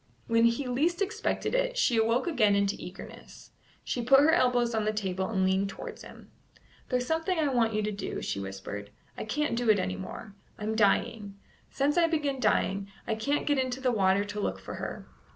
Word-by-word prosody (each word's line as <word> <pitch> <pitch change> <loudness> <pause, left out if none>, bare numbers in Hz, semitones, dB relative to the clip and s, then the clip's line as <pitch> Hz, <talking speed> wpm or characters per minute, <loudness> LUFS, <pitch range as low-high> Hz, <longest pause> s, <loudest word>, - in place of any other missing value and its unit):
When 230 0 +3
he 235 +4 +1
least 305 +9 +1
expected 440 +4 -1
it, - - 0
she 255 - +3
awoke 230 +3 +2
again 220 -12 +3
into 200 0 +1
eagerness; 180 +1 -11 0.3
she 245 - -2
put 270 +3 +6
her 305 +2 +5
elbows 245 -4 +2
on 220 -1 0
the 215 - +1
table 190 -3 -2
and 190 -4 +1
leaned 190 +1 +1
towards - - -8
him. - - -13 0.6
"There's 250 -1 0
something 325 +5 0
I 305 -3 +2
want 230 -4 +1
you 215 - 0
to 210 - -1
do," 200 - -4
she - - -2
whispered. 100 +1 -6 0.3
"I - - -5
can't 295 +3 -1
do 240 -1 0
it 215 - +6
any 95 - -2
more. 95 - -8 0.2
I'm 215 +1 -2
dying. 205 -1 +1 0.3
Since 290 +5 +1
I 335 - +4
began 295 -5 -1
dying, 200 -3 +1 0.2
I 225 - -1
can't 280 +7 -1
get 290 -2 +2
into 255 0 -1
the 260 -1 +1
water 200 -2 +2
to 205 +1 -5
look - - -1
for - - -8
her. - - -6
230 Hz, 205 wpm, -29 LUFS, 200-275 Hz, 0.6 s, put